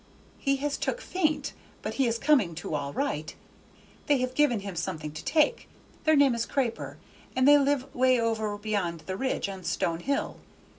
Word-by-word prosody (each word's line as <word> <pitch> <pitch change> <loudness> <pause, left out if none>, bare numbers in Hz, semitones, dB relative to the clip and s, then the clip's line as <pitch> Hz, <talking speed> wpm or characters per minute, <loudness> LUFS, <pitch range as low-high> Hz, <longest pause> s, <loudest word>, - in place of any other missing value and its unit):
"He 275 0 +1
was 290 -1 0
took - - -1
faint, 345 -9 -1 0.3
but - - -3
he 270 -2 +2
is 230 0 0
coming 245 - +3
to 165 0 -5
all 145 -1 -2
right; 150 +2 -2 0.7
they 290 - +4
have 255 0 -2
give 295 +2 +4
him 200 -5 -3
something 160 -3 -3
to 155 - -8
take: 320 +9 +2 0.4
their 315 0 +5
name 280 -3 +5
is 235 0 -2
Craper, 255 -5 -2 0.4
and 260 +1 +3
they 290 0 +8
live 280 -1 0
way 255 0 +4
over 220 -2 -1
beyond 200 -6 -2
the 185 +4 -5
Ridge, 260 -1 -1
on 190 -2 -7
Stone 165 -1 -1
Hill. 280 - -2
235 Hz, 185 wpm, -28 LUFS, 185-280 Hz, 0.7 s, they